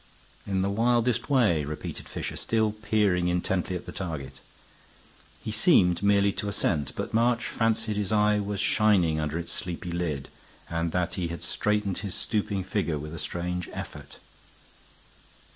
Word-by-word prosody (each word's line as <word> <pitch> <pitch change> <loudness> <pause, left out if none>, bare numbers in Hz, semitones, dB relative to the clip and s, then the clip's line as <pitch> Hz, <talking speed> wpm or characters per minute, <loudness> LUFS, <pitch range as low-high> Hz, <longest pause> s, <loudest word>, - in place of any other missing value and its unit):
"In 95 -1 +1
the 100 - +1
wildest 120 +2 +2
way," 110 - +3
repeated 75 +2 -6
Fisher, - - -4
still 110 -2 +1
peering 105 -4 +1
intently 90 +1 0
at 90 - -5
the - - -7
target. 75 -8 -5 1.1
He 110 - -3
seemed 100 - +4
merely 100 0 +4
to 105 - -2
assent, 75 -8 0
but - - -4
March 120 +1 +2
fancied 115 -2 0
his 105 -1 -1
eye 105 0 +4
was 100 -1 -3
shining 95 -8 +3
under 75 +1 -1
its 85 0 -4
sleepy 90 -2 -4
lid 80 -6 -2 0.4
and 85 0 -1
that 90 0 0
he 90 -3 -2
straightened 105 -2 0
his 100 -3 -3
stooping 105 -3 -1
figure 95 -5 -1
with 75 +2 -6
a 85 - -5
strange 90 0 -3
effort. - - -7
100 Hz, 150 wpm, -27 LUFS, 85-105 Hz, 1.1 s, seemed